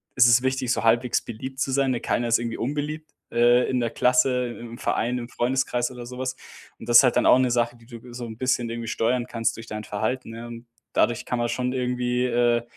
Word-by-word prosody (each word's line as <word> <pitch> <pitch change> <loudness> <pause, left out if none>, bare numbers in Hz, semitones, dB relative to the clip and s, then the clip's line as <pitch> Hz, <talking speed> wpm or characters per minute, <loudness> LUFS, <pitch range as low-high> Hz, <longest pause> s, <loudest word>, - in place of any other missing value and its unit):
ist 125 -1 +6
es 120 +1 +5
wichtig, 130 -1 -1
so - - -2
halbwegs 120 +2 +2
beliebt 130 +4 -8
zu 135 - 0
sein, 135 0 +2
ne? 120 - -2
Keiner 120 - -1
ist 115 - +3
irgendwie 115 -1 -4
unbeliebt, 150 +4 -4 0.2
äh, 120 +1 +4
in 130 - 0
der 120 -1 0
Klasse, 125 +1 +2
i - - -12
im 120 0 -9
Verein, 125 +1 -1
im 120 0 -6
Freundeskreis 125 0 -1
oder 125 -1 -9
so 125 +1 -9
was. 130 -1 -3 0.4
Und 115 - -10
das 120 +3 +8
halt 125 -2 +3
dann - - +2
auch 125 - +6
'ne 130 -1 +2
Sache, 120 0 0
die 115 - -20
du 115 -2 -11
g 125 0 -13
so 120 0 -6
'n 110 -1 -8
bisschen 125 -2 0
irgendwie 115 0 -5
steuern 120 +2 0
kannst 115 -1 -1
durch 115 0 -10
dein 105 0 -6
Verhalten, 115 +3 -3
ja? 120 +1 -8
Und 115 0 -10 0.3
dadurch 120 -2 +1
kann 125 - -2
man 120 - 0
schon 125 0 -1
irgendwie, 125 -1 -1
äh, 120 -1 +2
120 Hz, 245 wpm, -24 LUFS, 115-125 Hz, 0.4 s, das